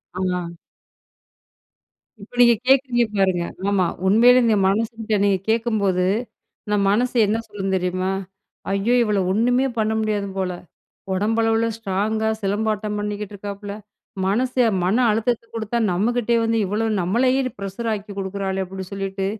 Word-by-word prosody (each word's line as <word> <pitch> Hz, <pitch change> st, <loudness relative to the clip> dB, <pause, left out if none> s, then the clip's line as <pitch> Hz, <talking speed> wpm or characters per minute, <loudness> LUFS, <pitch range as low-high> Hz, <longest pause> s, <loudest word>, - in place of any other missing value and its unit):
ஆ. 180 Hz, -2 st, -2 dB, 1.6 s
இப்ப 205 Hz, +4 st, -13 dB
நீங்க 235 Hz, -1 st, +7 dB
கேக்குறீங்க 260 Hz, -2 st, +4 dB
பாருங்க, 185 Hz, -3 st, +2 dB, 0.3 s
ஆமா 195 Hz, -3 st, +2 dB, 0.2 s
உண்மையிலயே 240 Hz, +5 st, +6 dB
நீங்க 220 Hz, -2 st, +3 dB
மனசு 215 Hz, +4 st, +1 dB
கிட்ட 220 Hz, -1 st, 0 dB
நீங்க 200 Hz, -1 st, +3 dB
கேக்கும்போது, 215 Hz, -5 st, +1 dB, 0.6 s
நம்ம 210 Hz, -1 st, +2 dB
மனசு 245 Hz, +5 st, +1 dB
என்ன 210 Hz, +2 st, 0 dB
சொல்லும் 195 Hz, -2 st, -3 dB
தெரியுமா? 185 Hz, 0 st, -1 dB, 0.6 s
"ஐயோ! 200 Hz, +5 st, +1 dB
இவள 210 Hz, -3 st, +1 dB
ஒண்ணுமே 245 Hz, +6 st, +2 dB
பண்ண 220 Hz, 0 st, +1 dB
முடியாது 210 Hz, -2 st, -1 dB
போல, 185 Hz, -1 st, -1 dB, 0.6 s
உடம்பளவில 225 Hz, +3 st, +1 dB
ஸ்ட்ராங்கா 220 Hz, +1 st, -1 dB
சிலம்பாட்டம் 210 Hz, +1 st, -1 dB
பண்ணிக்கிட்டு 210 Hz, 0 st, -4 dB
இருக்காப்ல, 200 Hz, 0 st, -7 dB, 0.5 s
மனசு 250 Hz, +5 st, 0 dB, 0.2 s
மன 190 Hz, +5 st, +2 dB
அழுத்தத்த 225 Hz, +2 st, 0 dB
குடுத்தா 225 Hz, +1 st, -2 dB
நம்மகிட்டயே 235 Hz, +4 st, +1 dB
வந்து 225 Hz, 0 st, +1 dB
இவ்வளோ, 210 Hz, +4 st, -1 dB, 0.2 s
நம்மளயே 255 Hz, +9 st, +2 dB, 0.2 s
ப்ரஷர் 200 Hz, +4 st, -4 dB
ஆக்கி 205 Hz, 0 st, -7 dB
குடுக்குறாளே!" 195 Hz, 0 st, -2 dB
அப்படின்னு 190 Hz, 0 st, -8 dB
சொல்லிட்டு, 195 Hz, 0 st, -3 dB
210 Hz, 125 wpm, -22 LUFS, 195-225 Hz, 1.6 s, நீங்க